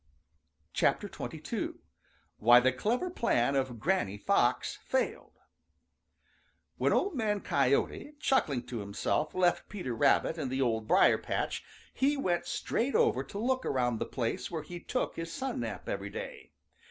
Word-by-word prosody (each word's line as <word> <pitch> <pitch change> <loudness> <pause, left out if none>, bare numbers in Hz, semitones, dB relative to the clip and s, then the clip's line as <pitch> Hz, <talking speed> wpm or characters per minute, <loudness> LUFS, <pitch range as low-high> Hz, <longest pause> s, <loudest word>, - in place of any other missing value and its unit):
XXII. - - -1 0.7
WHY 120 +3 +8
THE 130 +1 +3
CLEVER 240 - -1
PLAN 140 - +1
OF 130 -4 -1
GRANNY 105 - 0
FOX 200 - +1
FAILED - - -2 1.4
|WHEN - - +2
Old 400 - +2
Man 215 -6 0
Coyote, 140 - +1
chuckling 150 - +1
to 120 -3 -5
himself, 100 +9 -1
left 180 -1 +2
Peter 180 - -4
Rabbit 160 +7 +3
and 135 - -2
the 130 +1 -2
Old 110 -4 0
Briar - - +5
patch, - - -2 0.3
he 280 +2 +2
went 175 -10 0
straight 255 +4 -1
over 130 - +3
to 200 - -9
look 255 +4 0
around 120 -3 0
the - - -2
place 115 -3 -2
where 160 -3 -4
he 175 +3 -8
took 250 +8 -2
his 165 0 -4
sun 265 +5 -3
nap 115 -3 -5
every - - -3
day. - - -8
155 Hz, 145 wpm, -31 LUFS, -, 1.4 s, WHY